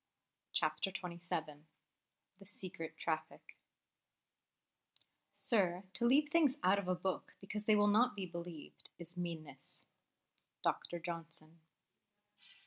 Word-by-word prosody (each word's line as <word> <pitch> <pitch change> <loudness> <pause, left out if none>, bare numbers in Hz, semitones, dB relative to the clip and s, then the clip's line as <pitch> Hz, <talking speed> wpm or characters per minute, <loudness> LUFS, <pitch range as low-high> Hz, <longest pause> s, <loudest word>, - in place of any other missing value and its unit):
CHAPTER 195 - +2
XXVII 170 -5 -4 0.7
The 195 - -14
Secret 185 -4 -4
Traffic 160 -2 -3 1.8
"Sir, 185 -5 +2
to 235 - +2
leave 295 +4 +5
things 300 -4 +4
out 195 +2 +5
of 195 - -4
a 185 - +2
book 185 +1 -3
because 210 +2 -5
they 215 - +6
will 205 0 +5
not 215 +3 +5
be 195 -2 -2
believed, 170 -3 -8
is 170 0 -8
meanness." 160 -6 -6 0.8
DR. 175 - 0
JOHNSON. 165 -1 -6
180 Hz, 110 wpm, -37 LUFS, 165-205 Hz, 1.8 s, they